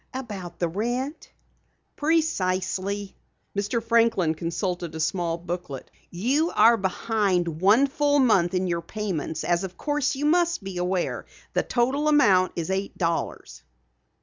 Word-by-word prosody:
"About 195 -9 -6
the 175 - 0
rent?" 240 - -3 0.7
"Precisely." 200 - -1 0.4
Mr. 205 +3 -1
Franklin 230 -8 +3
consulted 175 0 -3
a - - -5
small 170 0 -1
booklet. 175 -5 -6 0.2
"You 265 - +1
are 235 +1 +6
behind 190 -5 -1
one 210 +8 +5
full 290 +1 +1
month 195 -10 +3
in 185 +1 +1
your 170 -2 -1
payments, 185 -6 -4
as 175 +1 +1
of 185 -2 -6
course 290 -2 0
you 285 +2 -2
must 345 - +2
be 190 -2 -6
aware. 180 0 -2 0.3
The - - +2 0.4
amount 245 -12 +4
totals 170 +1 -3
eight 195 +1 -3
dollars." 165 - -3
195 Hz, 130 wpm, -25 LUFS, 175-245 Hz, 0.7 s, are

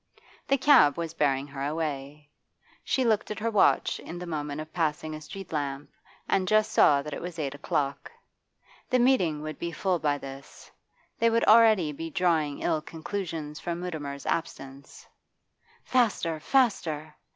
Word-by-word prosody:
The 275 - +3
cab 250 - +5
was 165 -1 -4
bearing 140 -4 +1
her 140 -1 -7
away. 150 -1 -4 0.5
She 260 - 0
looked 220 -3 +1
at 210 - -4
her 230 +1 -1
watch 210 - +3
in 175 - -8
the 180 - -6
moment 150 -3 -4
of 155 0 -8
passing 155 -2 -1
a 155 - -7
street 170 +4 -9
lamp 140 -1 -3 0.4
and 185 -1 +1
just 215 +1 +3
saw 140 -1 +5
that 150 0 -6
it - - -5
was 175 0 -7
eight 145 -3 -3
o'clock. 145 - -2 0.8
The 255 - +3
meeting 185 - +2
would 155 0 -6
be 170 - -3
full 180 +2 -1
by 145 -2 +1
this; 135 0 -11 0.5
they 230 - +4
would 230 0 +2
already 215 -8 +6
be 165 +3 -6
drawing 160 -4 0
ill 155 - +1
conclusions 160 -2 -5
from 170 -1 -4
Mutimer's 150 -6 -5
absence 140 -4 -5 0.8
Faster, 210 -10 +1
faster! 160 - 0
160 Hz, 160 wpm, -27 LUFS, 145-185 Hz, 0.8 s, already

